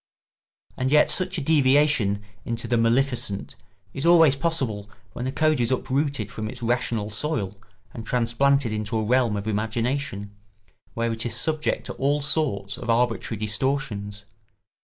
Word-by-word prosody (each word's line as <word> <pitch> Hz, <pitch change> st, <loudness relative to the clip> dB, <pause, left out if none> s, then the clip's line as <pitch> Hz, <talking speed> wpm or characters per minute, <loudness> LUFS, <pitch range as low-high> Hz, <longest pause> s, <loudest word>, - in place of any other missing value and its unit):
And 130 Hz, +1 st, 0 dB
yet 150 Hz, 0 st, +5 dB
such 185 Hz, 0 st, 0 dB
a -, -, -2 dB
deviation 135 Hz, -8 st, +3 dB, 0.2 s
into 115 Hz, -1 st, -3 dB
the 120 Hz, -, +1 dB
maleficent 115 Hz, -3 st, 0 dB, 0.4 s
is 135 Hz, -, -4 dB
always 165 Hz, -4 st, +6 dB
possible 130 Hz, -10 st, -2 dB, 0.2 s
when 125 Hz, -, -4 dB
a -, -, -1 dB
code 155 Hz, +1 st, +2 dB
is 120 Hz, -1 st, +1 dB
uprooted 130 Hz, -3 st, -1 dB
from 110 Hz, -3 st, -5 dB
its 125 Hz, +1 st, -9 dB
rational 115 Hz, -3 st, -1 dB
soil 105 Hz, -5 st, -2 dB, 0.4 s
and 115 Hz, -, -7 dB
transplanted 125 Hz, +1 st, +1 dB
into 110 Hz, +1 st, -2 dB
a 110 Hz, -, 0 dB
realm 120 Hz, -2 st, +2 dB
of 100 Hz, +1 st, -5 dB
imagination, 110 Hz, 0 st, -2 dB, 0.6 s
where 115 Hz, 0 st, 0 dB
it 115 Hz, 0 st, -3 dB
is 115 Hz, -2 st, -2 dB
subject 155 Hz, +4 st, -1 dB
to -, -, -5 dB
all 145 Hz, +2 st, +1 dB
sorts 140 Hz, -9 st, -1 dB
of -, -, -7 dB
arbitrary 115 Hz, -1 st, +1 dB
distortions. 105 Hz, -3 st, -2 dB
120 Hz, 150 wpm, -24 LUFS, 110-140 Hz, 0.6 s, always